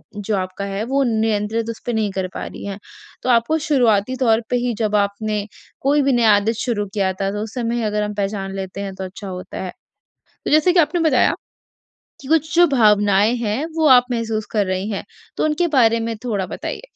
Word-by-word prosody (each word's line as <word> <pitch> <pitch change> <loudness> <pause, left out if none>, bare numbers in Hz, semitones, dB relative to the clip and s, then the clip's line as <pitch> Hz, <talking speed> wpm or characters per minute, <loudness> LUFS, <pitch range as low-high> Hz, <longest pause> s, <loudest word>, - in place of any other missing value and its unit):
जो 205 +1 -2
आपका 185 +1 -4
है 200 +1 -3
वो 275 +3 +1
नियंत्रित 220 -1 0
उस 230 - -5
पे 240 - -1
नहीं 220 -2 0
कर 190 -1 -2
पा - - -5
रही - - -8
हैं। 200 -1 -5 0.5
तो - - -1
आपको 240 +6 +3
शुरुआती 245 -5 +2
तौर 230 -3 +3
पे - - +1
ही 245 - 0
जब 215 -2 0
आपने 205 +1 0 0.4
कोई 285 +2 +3
भी 275 0 +2
नया 235 -3 +4
आदत 205 +2 +1
शुरू 220 -5 -1
किया 195 -3 0
था, 195 +1 -2
तो 205 +1 -4
उस 220 - -8
समय 235 -1 -1
अगर 210 -1 0
हम 210 0 -3
पहचान 195 -1 -3
लेते 195 0 -5
हैं 195 -1 -5
तो 190 - -6
अच्छा 190 +2 -8
होता 185 -1 -7
है। 185 - -5 0.7
तो - - -2
जैसे 310 +4 +4
कि 350 - +5
आपने 325 +2 +1
बताया 255 -5 +3 0.9
कि 270 - -11
कुछ 315 +2 +1
जो 350 0 +6
भावनाएँ 210 -4 +4
हैं, 230 +5 -1
वो 320 -1 +3
आप 250 -2 +7
महसूस 225 -2 -2
कर 210 -2 +1
रही 185 +2 -2
हैं। 200 - -3 0.3
तो - - 0
उनके 310 +3 +1
बारे 230 -2 +4
में 225 0 -3
थोड़ा 205 -6 -1
बताइए? - - -6
220 Hz, 215 wpm, -20 LUFS, 200-245 Hz, 0.9 s, आप